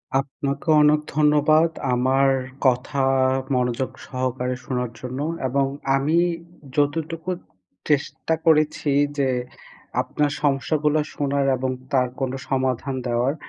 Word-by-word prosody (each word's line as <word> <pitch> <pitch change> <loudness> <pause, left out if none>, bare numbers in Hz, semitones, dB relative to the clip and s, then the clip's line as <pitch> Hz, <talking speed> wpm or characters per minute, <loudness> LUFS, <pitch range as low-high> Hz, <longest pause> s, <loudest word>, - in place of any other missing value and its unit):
আপনাকেও 140 +3 0
অনেক 150 0 +5 0.2
ধন্যবাদ 155 +2 +4 0.2
আমার 130 +2 +3 0.4
কথা 130 +2 +2 0.5
মনোযোগ 125 +1 0 0.2
সহকারে 130 -1 -2
শোনার 125 -2 -2
জন্য। 130 +1 -5 0.3
এবং 135 +2 +1 0.3
আমি 150 +5 +1 0.6
যতটুকু 160 +3 -1 0.6
চেষ্টা 150 +2 0
করেছি 155 -1 +3 0.3
যে 135 -2 +2 0.7
আপনার 145 -1 -1
সমস্যাগুলো 150 +2 +1 0.2
শোনার 140 -1 0
এবং 130 +1 -1 0.2
তার 125 -1 +3
কোনো 135 0 -1
সমাধান 130 0 -1
দেওয়ার। 120 +4 +1
140 Hz, 100 wpm, -23 LUFS, 130-150 Hz, 0.7 s, অনেক